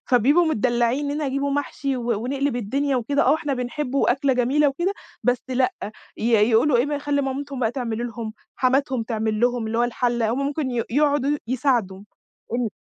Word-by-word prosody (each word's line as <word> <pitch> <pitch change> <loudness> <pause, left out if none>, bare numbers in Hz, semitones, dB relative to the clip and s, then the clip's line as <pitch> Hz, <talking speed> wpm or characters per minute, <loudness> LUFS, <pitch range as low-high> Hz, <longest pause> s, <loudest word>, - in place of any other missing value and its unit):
فبيبقوا 270 +8 +4
متدلعين 240 0 +1
منين 290 +2 -2
هيجيبوا 275 0 -1
محشي 280 -1 -2
و 240 -1 -1
ونقلِب 275 0 -1
الدنيا 270 +5 0
وكده. 280 +4 +1
آه - - +4
إحنا 295 -3 -2
بنحبه 255 +2 -2
وأكلة 270 +2 +2
جميلة 265 +4 +3
وكده. 345 +8 -1 0.3
بس 245 0 +1
لأ، 255 0 +1 0.4
ي - - -6 0.3
يقولوا 245 +4 +4
إيه 240 - +3
ما 290 0 -2
يخلّوا 285 -1 0
مامتهم 275 0 -4
بقى 225 -2 +1
تعمل 240 -2 -3
لهم، 225 -2 -6 0.2
حماتهم 260 -2 +1
تعمل 220 -2 -2
لهم 245 -1 +1
اللي 225 - -2
هو 240 - +3
الحلّة. 240 -1 0
هُم 275 +2 -1
ممكن 285 -2 -2
ي 235 -2 0
يقعدوا 290 +1 +2
يساعدوا، 235 -7 0 0.5
إمم. 240 -2 0
255 Hz, 180 wpm, -23 LUFS, 240-280 Hz, 0.5 s, فبيبقوا